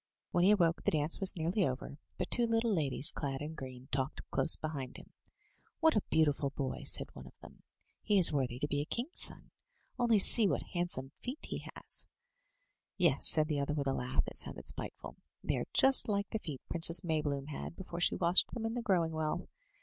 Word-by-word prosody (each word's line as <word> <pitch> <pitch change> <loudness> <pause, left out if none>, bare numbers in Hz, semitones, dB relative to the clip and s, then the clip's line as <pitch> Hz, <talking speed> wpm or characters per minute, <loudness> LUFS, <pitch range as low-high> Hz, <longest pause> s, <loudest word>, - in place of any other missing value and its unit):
When 175 - +1
he 190 - +4
awoke 170 -5 +2
the - - +1
dance 155 0 -1
was 195 0 +4
nearly 170 +5 -1
over, 135 0 -5 0.2
but - - -5
two 240 -1 +1
little 225 -1 0
ladies 150 -2 +3
clad 135 -3 -5
in 150 +2 -7
green 130 -3 -10
talked 135 +2 -4
close 160 - +3
beside 140 -5 -7
him. - - -16 0.7
*'What 320 -4 +2
a 210 - +1
beautiful 150 -3 0
boy!'' 135 -1 -6
said - - +1
one 65 -1 -12
of - - -18
them. - - -15 0.4
"He 210 -1 0
is 180 -4 +11
worthy 130 -4 -2
to 145 - -3
be 145 0 -2
a - - -5
king's 245 - -1
son. - - +1 0.5
Only 235 -3 +2
see 210 +2 +9
what - - -2
handsome 175 -7 -3
feet 255 +5 -7
he - - -7
has!" - - -3 0.9
Yes," 170 -7 +1
said 155 -1 +4
the 150 -2 -2
other, 140 +1 -3
with 140 -2 -3
a 135 - -1
laugh 130 +1 -2
that - - -6
sounded - - -4
spiteful; - - -7 0.3
"they - - -2
are - - -5
just 265 -3 +3
like 200 -1 -2
the 220 - -3
feet 150 -9 -8
Princess 170 0 +3
Maybloom 150 -4 -3
had 150 - -8
before 175 -2 -8
she - - +1
washed 175 +7 +1
them 230 -2 -5
in 225 - -3
the 245 - -4
Growing 175 -7 0
Well. 160 +2 -4
160 Hz, 210 wpm, -31 LUFS, 140-195 Hz, 0.9 s, is